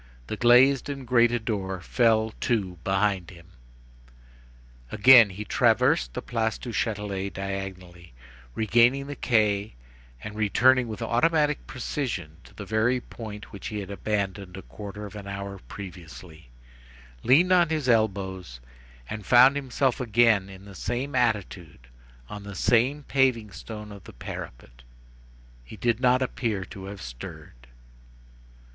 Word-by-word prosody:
The - - -4
glazed 125 +4 +4
and 135 -2 -6
grated 120 -1 +2
door 95 -4 -3
fell 110 +2 +1
to 95 -8 -1
behind 95 -2 0
him. 85 -1 -15 1.4
Again 115 0 +7
he 100 +3 -7
traversed 125 +9 +2
the 125 - -4
Place 110 -2 -1
du 125 - -8
Châtelet 100 -3 -3
diagonally, 95 -4 -7 0.4
regained 120 +5 +3
the 145 - -6
quay, 105 - +1 0.5
and 105 - -6
returned 120 +4 +3
with 110 -3 -5
automatic 150 +3 +1
precision 115 - -4
to - - -18
the 100 - -8
very 110 +5 +1
point 105 -4 -10
which 100 - -7
he 105 - -5
had 100 0 -7
abandoned 100 -2 -3
a 95 - -9
quarter 105 0 -8
of 105 - -10
an 100 -1 -8
hour 100 0 -6
previously, 85 -5 -11 0.7
leaned 155 +10 +4
on 175 -3 +5
his 155 -4 -2
elbows 95 - 0 0.5
and 105 -1 -6
found 125 +5 +6
himself 135 -2 -1
again 115 -4 +3
in 95 0 -12
the 100 - -12
same 125 +8 -4
attitude 100 - -2 0.4
on 105 -1 -8
the 100 -1 -9
same 125 +8 +2
paving 130 -6 +1
stone 105 +4 -9
of 100 -2 -12
the - - -12
parapet. - - -9 0.8
He - - -12
did 120 +1 0
not 125 0 +3
appear 110 -6 -2
to 95 0 -10
have 100 0 -8
stirred. - - -10
105 Hz, 140 wpm, -26 LUFS, 95-125 Hz, 1.4 s, Again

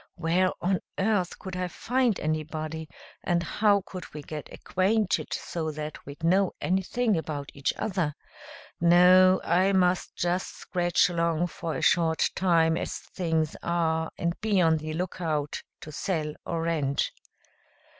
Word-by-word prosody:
Where 175 +2 +2
on 185 0 +2 0.2
earth 195 -3 +1
could 190 -1 -7
I 180 0 -1
find 245 +4 0
anybody, 155 0 -3 0.3
and 170 -1 +1
how 205 +2 +2
could 185 -2 -8
we 150 - -6
get 150 0 -7
acquainted 200 +2 0
so 160 -2 -3
that 155 0 -6
we'd 145 +3 -10
know 185 +3 +3
anything 195 +5 +1
about 150 -3 -4
each 140 -1 0
other? 180 -8 -1 0.6
No, 180 +2 +6
I 185 +3 +3
must 180 -1 +2
just 175 +2 -1
scratch 175 -2 +1
along 170 -1 0
for 165 -1 -4
a - - -3
short 165 -2 +3
time 165 -3 +3
as - - -3
things 160 -3 -2
are 160 -1 0
and 170 0 0
be 210 -3 +2
on 165 -2 +4
the 155 0 -5
lookout 160 -4 -2 0.2
to 155 - -8
sell 155 -1 -2
or 165 -1 -2
rent." 150 -4 0
170 Hz, 145 wpm, -27 LUFS, 160-185 Hz, 0.6 s, No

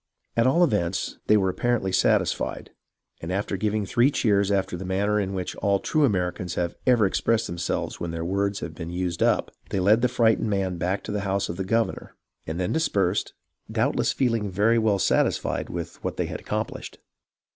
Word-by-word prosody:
At 115 +1 +3
all 170 +7 +4
events, 100 - 0
they 105 - +6
were 95 -2 +2
apparently 100 0 0
satisfied, - - +1 0.5
and 80 - -5
after 100 +1 -1
giving 105 +1 -1
three 120 +6 +3
cheers 100 -7 +2
after 95 -2 0
the 90 - -6
manner 100 +3 +1
in 95 -1 -2
which 90 -1 -4
all 100 0 +2
true 155 +6 +2
Americans 90 -4 -1
have 85 -1 -1
ever 120 -4 +5
expressed 115 +3 +1
themselves 85 0 -3
when 85 - -3
all - - -5
their 85 0 -3
words 100 +2 -1
have 80 - -5
been 80 +1 -7
used 90 -1 -3
up, - - +2 0.2
they 100 - -1
led 105 +5 +4
the 125 - +4
frightened 115 -2 +2
man 95 -3 -1
back 90 +3 -1
to - - -5
the 105 - -1
house 100 0 -1
of 85 - -4
the 95 - -2
governor, 115 +4 -1 0.3
and 80 +2 -3
then 90 - -1
dispersed, 100 - 0 0.4
doubtless - - +1
feeHng 115 -5 0
very 105 +5 +3
well 110 -3 +2
satisfied - - +1
with 85 -1 -6
what - - -3
they - - 0
had - - -5
accomplished. - - -4
100 Hz, 195 wpm, -25 LUFS, 90-110 Hz, 0.5 s, they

